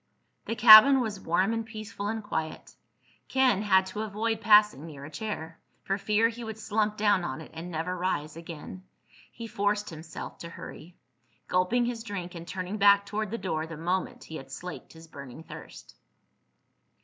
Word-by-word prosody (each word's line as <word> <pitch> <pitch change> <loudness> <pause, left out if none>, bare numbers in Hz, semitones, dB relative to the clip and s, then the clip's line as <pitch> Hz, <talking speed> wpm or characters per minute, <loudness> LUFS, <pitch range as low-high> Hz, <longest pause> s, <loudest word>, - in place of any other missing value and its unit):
The 230 - -3
cabin 225 +4 +10
was 220 -5 -3
warm 185 +5 +1
and 225 0 -2
peaceful 215 -2 -7
and 220 0 -3
quiet. 160 -6 -4 0.5
Ken 255 -6 +3
had 190 -2 +4
to 190 +3 -5
avoid 220 +1 -2
passing 210 -8 +5
near 140 -3 -10
a 155 - -10
chair, 165 -2 -6 0.2
for 195 +1 -1
fear 215 +2 +2
he 235 +1 -7
would 220 -1 -6
slump 215 -1 -1
down 205 -3 +3
on 155 -4 -4
it 160 - -11
and 165 +2 -7
never 170 +2 -3
rise 175 -4 -2
again. 165 +2 -9 0.5
He 230 - -8
forced 205 -2 -1
himself 160 0 -9
to 170 - -8
hurry, 170 0 -11 0.5
gulping 185 +7 +2
his 235 -1 -3
drink 200 -6 -6
and 170 -1 -9
turning 185 +2 -4
back 200 0 +5
toward 215 0 -3
the 230 - -3
door 160 -6 -3
the 165 -1 -8
moment 180 +4 -2
he 160 - -8
had 135 -2 -11
slaked 180 +5 -8
his 165 0 -13
burning 140 -1 -10
thirst. - - -12
200 Hz, 175 wpm, -28 LUFS, 165-215 Hz, 0.5 s, cabin